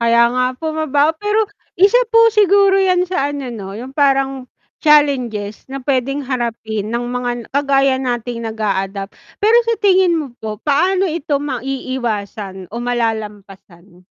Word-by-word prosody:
Kaya 235 0 +4
nga 255 0 +1
po, 315 +4 -4
mabaho. 310 -1 +1
Pero 415 +1 +1 0.4
isa 395 +7 +5
po 455 0 +7
siguro 400 -2 +4
'yan 365 -2 +2
sa 350 -6 -1
ano 280 -3 -5
'no, 200 -3 -7
'yong 250 +4 -8
parang 270 -2 +1 0.4
challenges 255 -9 +2
na 275 - -4
puwedeng 275 +1 -1
harapin 225 -4 -3
ng 235 +1 -2
mga 245 0 -2
n - - -6
kagaya 275 -1 +2
nating 240 -2 -3
nag-a-adopt. 200 -3 -3 0.2
Pero 435 +3 +4
sa 460 0 0
tingin 375 -4 +3
mo 305 - -3 0.2
po 215 -1 -5
paano 365 - +1
ito 310 -4 -1
maiiwasan 240 -8 -4
o - - -6
malalampasan? 205 -6 -5
260 Hz, 145 wpm, -17 LUFS, 220-310 Hz, 0.4 s, po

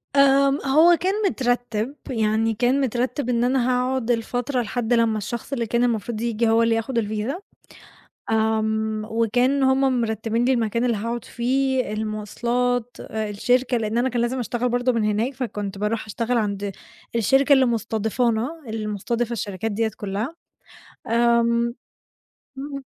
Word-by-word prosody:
آمم، 275 0 +5
هو 315 +6 +6
كان 375 +3 0 0.2
مترتّب، 245 -2 -1
يعني 225 -1 +1
كان 250 +5 +2
مترتّب 250 +1 -1
إن 240 -1 +1
أنا 255 0 +2
هاقعد 250 -1 0
الفترة 245 +3 -1
لحد 240 +1 -1
لمّا 230 -2 +3
الشخص 235 +6 -5
اللي 235 -3 -1
كان 235 +2 +1
المفروض 230 -1 -1
ييجي 230 -1 +1
هو 225 +1 +4
اللي 230 0 +3
ياخد 225 +2 -2
الفيزا. 220 - -2 0.9
آمم 220 0 0
وكان 245 +5 +2
هم 265 -1 +3
مرتّبين 225 +1 -1
لي 265 - +3
المكان 230 0 0
اللي 235 -3 +1
هاقعد 230 +3 -3
فيه، 260 -1 0
الموصلات، 235 +3 -2
آآ 220 -1 -4
الشركة، 245 +4 +1
لإن 220 0 -2
أنا 255 +2 +2
كان 240 -1 -1
لازم 245 +2 -1
أشتغل 245 +1 -1
برضه 245 +1 +1
من 230 -3 0
هناك، 215 +5 0
فكنت 210 -6 -4
باروح 210 +2 -1
أشتغل 230 +3 -1
عند 200 -2 -1 0.4
الشركة 270 +5 +4
اللي 265 -1 +5
مُستضيفانا، 230 +5 -1
اللي 220 -1 -4
مُستضيفة 235 +3 -2
الشركات 210 -1 -3
ديّة 220 +1 0
كلها. 210 +9 -3 0.7
آمم 235 0 +2 0.8
إمم. 275 0 -6
235 Hz, 145 wpm, -23 LUFS, 220-250 Hz, 0.9 s, هو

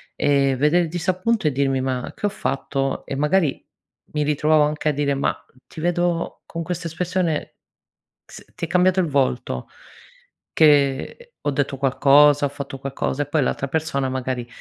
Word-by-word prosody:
ehm, 140 -2 +2
vedere 150 +7 +3
il 165 - -3
disappunto 185 +4 0
e 150 - +2
dirmi: 135 -1 0
"Ma 130 -1 -3
che 205 - -1
ho - - 0
fatto?" 135 -6 -2
E 135 - -4
magari 150 0 +1 0.5
mi 150 -1 0
ritrovavo 150 +1 +3
anche 150 +1 -1
a - - +4
dire: 140 0 0
"Ma 135 - -1 0.3
ti 155 - -9
vedo, 175 0 -1
con 165 0 -5
questa 175 0 -4
espressione 175 -1 -2 0.7
s - - -13
ti - - -4
è - - -9
cambiato 185 +1 +3
il 175 - +2
volto, 135 -3 -1 0.9
che 145 - +2 0.2
ho 145 - +2
detto 140 0 -1
qualcosa, 145 +2 +5
ho - - -1
fatto 140 -1 -7
qualcosa?" 135 +1 -2
E - - -9
poi 145 -1 +1
l'altra 140 - -1
persona 140 -3 -1
magari 130 -2 -3
145 Hz, 170 wpm, -22 LUFS, 135-165 Hz, 0.9 s, qualcosa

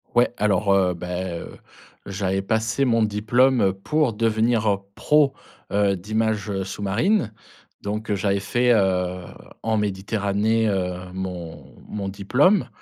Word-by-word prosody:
Ouais 120 0 +3
alors, 105 -1 +2
heu, 95 -2 +3
beh, 90 0 -4
heu, - - -10 0.5
j'avais 95 -1 -1
passé 110 +6 0
mon 115 -2 +3
diplôme, 115 +5 +2
heu, 95 -1 +3
pour 140 +6 0
devenir, 115 +1 +1
heu, 100 - +2 0.2
pro, 150 -2 +3 0.4
heu, 100 -1 +2
d'images 105 0 -1
sous-marine 105 - 0 0.5
donc 105 +1 -3
j'avais 100 0 0
fait, 120 +5 +2
heu, 90 -3 +1 0.4
en 110 0 +1
Méditerranée, 105 +2 0
heu, 90 -3 -1 0.2
mon 90 -3 -7
mon 100 -2 -4
diplôme 130 - +2
105 Hz, 125 wpm, -23 LUFS, 95-115 Hz, 0.5 s, Ouais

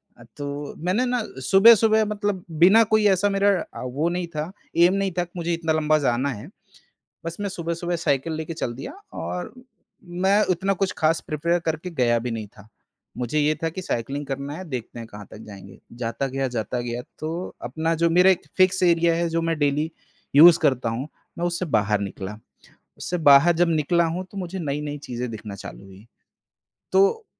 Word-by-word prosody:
अ, 120 - -16
तो 145 0 -5
मैंने 185 +9 0
ना 245 -1 0 0.3
सुबह-सुबह 220 +2 +6
मतलब 205 -3 -2 0.2
बिना 210 +6 +7
कोई 215 -1 +4
ऐसा 205 +3 +1
मेरा 195 -2 0 0.2
वो 160 +3 +1
नहीं 175 0 -3
था 155 +3 -3 0.3
ऐम 175 +2 +6
नहीं 195 -1 0
था 175 - +2
कि 175 - -13
मुझे 170 0 -1
इतना 165 -1 -1
लम्बा 155 0 +2
जाना 125 +3 +1
है। 120 0 -6 0.8
बस 165 0 -5
मैं 205 - -1
सुबह-सुबह 170 -1 -3
साइकिल 140 +4 0
लेके 160 +1 -5
चल 120 - -2
दिया 130 - -7 0.3
और 180 - -5 0.7
मैं 200 +2 +4
उतना 190 +3 -1
कुछ 190 - +1
ख़ास 160 +1 +2
प्रिपेयर 170 +3 +1
करके 160 +3 -3
गया 120 -1 +3
भी - - -2
नहीं 110 -1 -6
था। 100 0 -16 0.5
मुझे 125 +4 -1
ये 150 +1 +2
था 165 - +1
कि 185 +4 -6
साइक्लिंग 140 0 -3
करना 140 +1 -4
है 185 - -7
देखते 125 -4 -6
हैं 115 -1 -8
कहाँ 105 -1 -11
तक - - -11
जाएँगे 100 -2 -12 0.2
जाता 115 +4 -2
गया, 135 0 -2
जाता 120 0 -3
गया 120 0 -4 0.2
तो 155 - -4 0.4
अपना 160 +5 -1
जो 170 - +4
मेरा 180 +3 +6
एक 185 - 0
फिक्स 185 0 +3
एरिया 170 -1 +4
है 170 0 0
जो 165 0 -1
मैं 165 -1 -1
डेली 145 +2 0 0.5
यूज़ 165 +3 +9
करता 130 -3 +2
हूँ 125 +6 -4 0.3
मैं 170 - -1
उससे 175 +1 -2
बाहर 105 -1 +1
निकला, 100 +1 -6 0.6
उससे 180 - -3
बाहर 140 +5 +7
जब 175 +1 +3
निकला 165 +2 +2
हूँ 180 +2 -4
तो 200 - -8
मुझे 185 0 -5
नई-नई 145 -2 -3
चीज़ें 125 0 -4
दिखना 110 -2 -7
चालू 100 0 -10
हुई, 95 +3 -15 0.9
तो 195 - +3
160 Hz, 190 wpm, -23 LUFS, 130-180 Hz, 0.9 s, यूज़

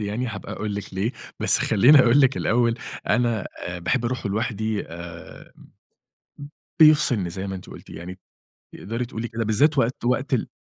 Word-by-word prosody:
يعني 105 +4 -3
هابقى 110 -5 -7
أقول 105 -1 -4
لِك 100 -2 -7
ليه، 100 +6 -1 0.3
بس - - +5
خلّيني 125 +8 +5
أقول 125 +2 +5
لِك 135 -1 +3
الأول 115 0 +1 0.3
أنا 115 -2 +1
آآ 85 0 -5
باحب 120 +8 -1
أروحه 120 -3 -2
لوحدي 110 0 -2
آآ 85 0 -11
م - - -17 1.1
بيفصلني 145 - +4
زي 95 +3 -5
ما 95 - -4
أنتِ 90 - -11
قُلتِ - - -13
يعني 90 +3 -9 0.6
تقدري 115 +5 -4
تقُولي 120 -1 -6
كده 115 0 -3
بالذات 140 +8 +2
وقت 125 0 0
وقت 130 +2 0
ال 120 - -1
110 Hz, 170 wpm, -23 LUFS, 100-125 Hz, 1.1 s, بس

